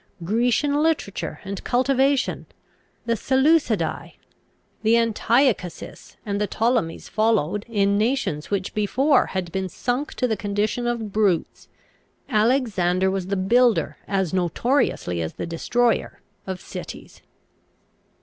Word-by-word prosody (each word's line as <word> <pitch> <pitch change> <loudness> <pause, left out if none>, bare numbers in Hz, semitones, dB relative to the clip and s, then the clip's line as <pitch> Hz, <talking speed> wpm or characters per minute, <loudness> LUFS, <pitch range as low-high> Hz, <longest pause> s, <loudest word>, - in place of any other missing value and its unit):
Grecian 245 - +1
literature 315 -11 -1
and 195 -1 -6
cultivation, 265 +2 +1 0.6
the 230 - +1
Seleucidae, 265 - +1 0.7
the 225 +1 +3
Antiochuses, 230 - 0
and 200 -1 -2
the 210 - +1
Ptolemies 225 -8 -1
followed, 210 -2 0
in 200 -2 +2
nations 215 - -1
which 200 -2 -2
before 255 +7 +2
had 185 -3 -4
been 190 0 -2
sunk 250 - -3
to 250 - 0
the 220 - 0
condition 210 +4 -1
of 230 -3 -2
brutes. 200 -6 0 0.6
Alexander 210 -6 +2
was 190 -2 -3
the 200 0 -1
builder, 235 +5 +2
as 190 -4 -1
notoriously 180 - 0
as 80 - -4
the - - -5
destroyer, 230 +8 0 0.3
of 190 -1 -4
cities." - - -9
215 Hz, 115 wpm, -23 LUFS, 190-245 Hz, 0.7 s, the